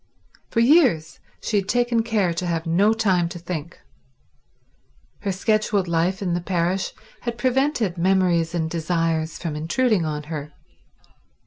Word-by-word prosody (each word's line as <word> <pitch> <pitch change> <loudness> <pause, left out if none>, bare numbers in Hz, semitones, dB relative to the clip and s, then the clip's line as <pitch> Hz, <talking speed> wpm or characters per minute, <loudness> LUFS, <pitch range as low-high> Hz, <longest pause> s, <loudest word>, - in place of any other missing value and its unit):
For 230 - +1
years 235 - +3 0.2
she 215 - 0
had 195 0 -1
taken 240 -1 +2
care 215 -6 0
to 175 +2 -3
have 165 -1 -1
no 185 +6 +3
time 190 -6 +1
to 175 - -7
think. 170 -2 -6 1.4
Her 200 -1 -2
scheduled 205 0 +1
life 170 +3 0
in 180 -2 0
the 175 - -1
parish 180 +1 -1 0.3
had 235 -1 -4
prevented 255 - 0
memories 175 -2 +2
and 160 -2 0
desires 165 -1 -1
from 165 -4 -4
intruding 195 +6 +1
on 150 -1 -3
her. 150 -1 -6
180 Hz, 140 wpm, -23 LUFS, 165-215 Hz, 1.4 s, years